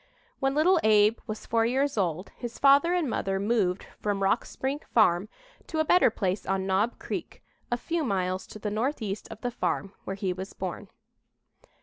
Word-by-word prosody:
When 270 Hz, 0 st, +1 dB
little 345 Hz, +4 st, +4 dB
Abe 215 Hz, +1 st, +4 dB
was 215 Hz, -1 st, -5 dB
four 225 Hz, 0 st, +2 dB
years 270 Hz, +5 st, +1 dB
old 180 Hz, -3 st, -1 dB
his 240 Hz, -1 st, -7 dB
father 280 Hz, +4 st, +5 dB
and 345 Hz, -5 st, +1 dB
mother 195 Hz, -5 st, -1 dB
moved 200 Hz, -3 st, +1 dB, 0.2 s
from 200 Hz, -1 st, -1 dB
Rock 195 Hz, +4 st, +2 dB
Spring 270 Hz, +2 st, -3 dB, 0.2 s
Farm 200 Hz, -3 st, +4 dB, 0.4 s
to 320 Hz, -, -4 dB
a 315 Hz, -, +2 dB
better 355 Hz, 0 st, +5 dB
place 195 Hz, -3 st, -2 dB
on 195 Hz, 0 st, 0 dB
Knob 195 Hz, +5 st, +1 dB
Creek, -, -, -6 dB, 0.3 s
a 240 Hz, -, +2 dB
few 330 Hz, +5 st, -2 dB
miles 185 Hz, -5 st, -1 dB
to -, -, -10 dB
the 210 Hz, 0 st, -4 dB
northeast 215 Hz, -3 st, -2 dB
of -, -, -10 dB
the 245 Hz, -, -2 dB
farm 190 Hz, -1 st, -2 dB
where 195 Hz, -, -4 dB
he 190 Hz, -2 st, -1 dB
was 190 Hz, +2 st, -7 dB
born. -, -, -5 dB
215 Hz, 185 wpm, -28 LUFS, 195-265 Hz, 0.4 s, father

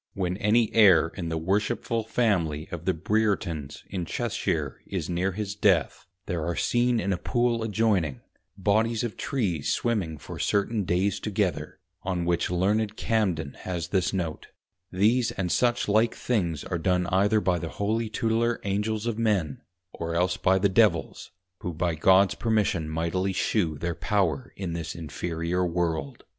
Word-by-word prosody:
When 90 Hz, -2 st, -1 dB
any 110 Hz, +2 st, +2 dB
Heir 95 Hz, -7 st, +6 dB
in 85 Hz, -1 st, -5 dB
the 80 Hz, -, -2 dB
Worshipful 105 Hz, +6 st, -1 dB
Family 90 Hz, -10 st, 0 dB
of 85 Hz, -1 st, -6 dB
the 95 Hz, -, +2 dB
Breertons 90 Hz, -6 st, -1 dB
in 95 Hz, -2 st, -4 dB
Cheshire -, -, -2 dB
is -, -, -3 dB
near 90 Hz, +2 st, 0 dB
his 100 Hz, 0 st, -3 dB
Death, 95 Hz, -9 st, +1 dB, 0.2 s
there 85 Hz, -4 st, -2 dB
are 85 Hz, +1 st, -2 dB
seen 120 Hz, +3 st, +2 dB
in 100 Hz, 0 st, 0 dB
a -, -, -1 dB
Pool 120 Hz, -2 st, 0 dB
adjoyning, 100 Hz, -, 0 dB, 0.4 s
Bodies 110 Hz, +4 st, +1 dB
of 120 Hz, -3 st, -3 dB
Trees 95 Hz, -, -1 dB
swimming 95 Hz, -10 st, -1 dB
for -, -, -9 dB
certain 100 Hz, 0 st, 0 dB
days 90 Hz, +3 st, +1 dB
together, 100 Hz, -6 st, -2 dB, 0.2 s
on 90 Hz, -2 st, -2 dB
which 85 Hz, -1 st, +1 dB
Learned 105 Hz, +4 st, 0 dB
Cambden 90 Hz, -10 st, 0 dB
has 85 Hz, -2 st, -4 dB
this 90 Hz, -2 st, +1 dB
note, 85 Hz, -5 st, -3 dB, 0.4 s
_These 115 Hz, +6 st, +2 dB
and 90 Hz, -3 st, -1 dB
such 120 Hz, +7 st, +2 dB
like 110 Hz, +3 st, +3 dB
things 85 Hz, -, -1 dB
are 85 Hz, -, -3 dB
done 90 Hz, +1 st, +1 dB
either 100 Hz, +3 st, +3 dB
by 90 Hz, -4 st, +1 dB
the 80 Hz, -, -5 dB
Holy 110 Hz, +4 st, -1 dB
Tutelar 115 Hz, +2 st, 0 dB
Angels 105 Hz, +2 st, -1 dB
of 115 Hz, -1 st, -2 dB
Men, 100 Hz, -10 st, 0 dB, 0.3 s
or 85 Hz, 0 st, -4 dB
else 90 Hz, +1 st, +2 dB
by 95 Hz, +1 st, +2 dB
the 100 Hz, +2 st, +3 dB
Devils, 95 Hz, -, +1 dB, 0.3 s
who 90 Hz, -, -4 dB
by 85 Hz, +1 st, 0 dB
Gods 95 Hz, +5 st, +4 dB
Permission 105 Hz, -8 st, 0 dB
mightily 85 Hz, +4 st, -1 dB
shew 90 Hz, -4 st, 0 dB
their 85 Hz, +3 st, -2 dB
Power 105 Hz, -, 0 dB
in 95 Hz, -4 st, -4 dB
this 85 Hz, 0 st, -4 dB
Inferiour 85 Hz, +2 st, -2 dB
World. 85 Hz, -5 st, -2 dB
95 Hz, 160 wpm, -26 LUFS, 85-110 Hz, 0.4 s, Heir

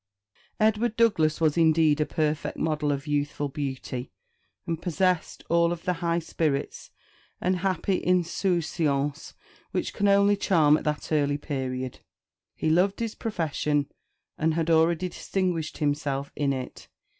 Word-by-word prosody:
Edward 220 Hz, +1 st, +2 dB
Douglas 165 Hz, -10 st, +3 dB
was 160 Hz, 0 st, +2 dB
indeed 160 Hz, -2 st, +4 dB
a 150 Hz, -, +1 dB
perfect 155 Hz, -2 st, -1 dB
model 150 Hz, -2 st, 0 dB
of 140 Hz, -1 st, -3 dB
youthful 145 Hz, -1 st, -1 dB
beauty, 130 Hz, -3 st, -5 dB, 0.5 s
and 165 Hz, -1 st, -3 dB
possessed 180 Hz, 0 st, 0 dB
of -, -, -12 dB
all 170 Hz, 0 st, +4 dB
the 175 Hz, +2 st, -2 dB
high 170 Hz, 0 st, -1 dB
spirits 155 Hz, -4 st, -2 dB, 0.5 s
and 185 Hz, +1 st, +1 dB
happy 185 Hz, 0 st, 0 dB
insouciance 165 Hz, -5 st, 0 dB, 0.3 s
which -, -, -2 dB
can 205 Hz, -, +1 dB
only 200 Hz, +1 st, +5 dB
charm 160 Hz, -7 st, +4 dB
at -, -, -3 dB
that 150 Hz, +1 st, -2 dB
early 145 Hz, -2 st, +2 dB
period. 130 Hz, -3 st, -4 dB, 0.6 s
He 155 Hz, -, 0 dB
loved 185 Hz, +4 st, +2 dB
his 230 Hz, -2 st, -2 dB
profession, 150 Hz, -7 st, -1 dB, 0.5 s
and 160 Hz, 0 st, +1 dB
had 165 Hz, 0 st, 0 dB
already 165 Hz, +2 st, +3 dB
distinguished 180 Hz, -3 st, -2 dB
himself 145 Hz, -2 st, -1 dB
in 145 Hz, -2 st, +1 dB
it. 130 Hz, -2 st, -6 dB
160 Hz, 135 wpm, -26 LUFS, 145-180 Hz, 0.6 s, only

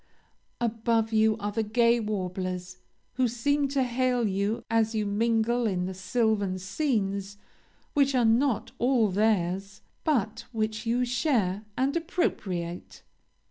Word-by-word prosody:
Above 230 Hz, -1 st, 0 dB
you 220 Hz, 0 st, +3 dB
are 205 Hz, -1 st, -3 dB
the 225 Hz, -, -1 dB
gay 235 Hz, +2 st, +3 dB
warblers, 185 Hz, -3 st, -3 dB, 0.4 s
who 255 Hz, -1 st, +3 dB
seem 280 Hz, +5 st, +1 dB
to 275 Hz, -1 st, +1 dB
hail 250 Hz, -1 st, +1 dB
you 200 Hz, +3 st, -1 dB
as 225 Hz, 0 st, +1 dB
you 215 Hz, -1 st, 0 dB
mingle 230 Hz, +3 st, +1 dB
in 180 Hz, -3 st, -1 dB
the 190 Hz, -, -4 dB
sylvan 200 Hz, 0 st, 0 dB
scenes 200 Hz, -, -2 dB, 0.6 s
which 280 Hz, -1 st, +3 dB
are 245 Hz, -2 st, +3 dB
not 230 Hz, +1 st, +2 dB
all 240 Hz, -4 st, +3 dB
theirs, 195 Hz, -1 st, 0 dB, 0.2 s
but 230 Hz, -, 0 dB
which 220 Hz, 0 st, -2 dB
you 245 Hz, +2 st, +2 dB
share 230 Hz, -, 0 dB
and 270 Hz, +3 st, +1 dB
appropriate. 190 Hz, -, -3 dB
220 Hz, 130 wpm, -27 LUFS, 200-245 Hz, 0.6 s, you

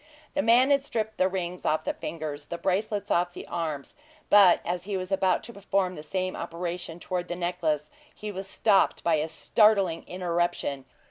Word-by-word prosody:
The 290 Hz, -, +1 dB
man 245 Hz, +4 st, +5 dB
had 280 Hz, -1 st, +4 dB
stripped 220 Hz, -5 st, -3 dB
the 185 Hz, -, +4 dB
rings 180 Hz, -1 st, -4 dB
off 155 Hz, -, +1 dB
the -, -, -1 dB
fingers, 150 Hz, -3 st, -6 dB
the 170 Hz, -, -4 dB
bracelets 200 Hz, +2 st, -1 dB
off 175 Hz, 0 st, +2 dB
the -, -, -7 dB
arms; 155 Hz, -5 st, -4 dB, 0.4 s
but 200 Hz, -4 st, +7 dB
as 175 Hz, 0 st, -2 dB
he 200 Hz, -1 st, -2 dB
was 185 Hz, 0 st, -5 dB
about 190 Hz, -1 st, +2 dB
to 235 Hz, -, -8 dB
perform 195 Hz, -2 st, 0 dB
the 150 Hz, -, -8 dB
same 185 Hz, +4 st, -2 dB
operation 170 Hz, 0 st, -5 dB
toward 180 Hz, 0 st, -3 dB
the 175 Hz, -, -3 dB
necklace, 160 Hz, -4 st, -1 dB, 0.2 s
he 210 Hz, 0 st, -7 dB
was 195 Hz, 0 st, -6 dB
stopped 200 Hz, 0 st, +2 dB
by 165 Hz, -2 st, +3 dB
a 155 Hz, +1 st, -1 dB
startling 195 Hz, +1 st, +3 dB
interruption 175 Hz, -3 st, -1 dB
enough. 135 Hz, -1 st, -12 dB
180 Hz, 190 wpm, -27 LUFS, 170-200 Hz, 0.4 s, but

